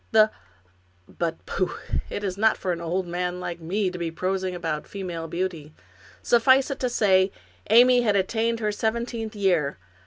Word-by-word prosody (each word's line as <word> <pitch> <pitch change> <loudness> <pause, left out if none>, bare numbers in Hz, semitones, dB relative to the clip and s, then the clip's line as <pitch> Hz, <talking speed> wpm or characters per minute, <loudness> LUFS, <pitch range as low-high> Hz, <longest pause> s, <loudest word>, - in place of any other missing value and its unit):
The 215 -1 +5 0.4
— 90 0 -37
but 165 -1 -2
pooh! 185 -2 -2 0.3
it 205 - -4
is 190 -2 -2
not 220 +2 +3
for 185 - -2
an 170 -1 -3
old 175 +3 -1
man 180 +1 -3
like 175 -1 -5
me 185 +4 -1
to 180 - -7
be 170 -1 -2
prosing 185 +2 -2
about 160 -3 -3
female 175 -4 -5
beauty; 165 -3 -4 0.5
suffice 260 +4 +4
it 275 - -4
to 250 - 0
say, 190 -5 +3 0.4
Amy 245 +3 +7
had 210 -4 +2
attained 225 +4 0
her 210 -1 +1
seventeenth 225 +1 -2
year. 175 -8 +1
190 Hz, 175 wpm, -25 LUFS, 170-220 Hz, 0.5 s, Amy